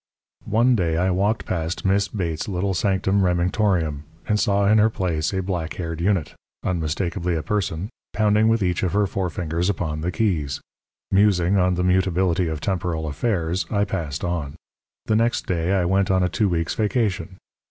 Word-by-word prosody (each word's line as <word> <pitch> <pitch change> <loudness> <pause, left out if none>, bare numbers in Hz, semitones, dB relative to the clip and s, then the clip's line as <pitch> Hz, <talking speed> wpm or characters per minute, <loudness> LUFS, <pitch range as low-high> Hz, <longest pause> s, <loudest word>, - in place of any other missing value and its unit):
One 120 +4 +3
day 85 -6 0
I 90 +2 +2
walked 100 +4 0
past 85 +1 -3
Miss 100 +1 +2
Bates's 85 -7 -3
little 95 0 -1
sanctum 95 +1 +1
Remingtorium, 90 -4 +1 0.3
and 105 0 +2
saw 100 -1 +2
in 110 +1 +5
her 110 +1 +5
place 85 -7 -1
a 95 -1 -1
black 90 -4 -3
haired 80 -2 -4
unit 90 -6 0 0.3
unmistakably 85 +1 -1
a 80 - -2
person 95 -3 -2 0.2
pounding 105 0 +3
with 115 -2 +2
each 90 -1 0
of 90 -3 -1
her 105 0 +3
forefingers 90 -2 -2
upon 80 -5 -2
the 90 +3 -1
keys. 80 -8 -1 0.5
Musing 95 -2 +3
on 90 -1 +2
the 90 - -1
mutability 90 -1 +2
of 80 -2 -3
temporal 85 -4 -2
affairs, 85 +1 -1
I 100 -1 +1
passed 85 -6 -4
on. 85 -5 -2 0.5
The 110 - +1
next 120 +3 +1
day 85 +1 0
I 95 -3 +2
went 95 +2 +2
on 95 -1 +3
a 90 - +1
two 105 +3 +1
weeks' 85 -3 -1
vacation. 105 -4 -1
90 Hz, 175 wpm, -23 LUFS, 85-100 Hz, 0.5 s, in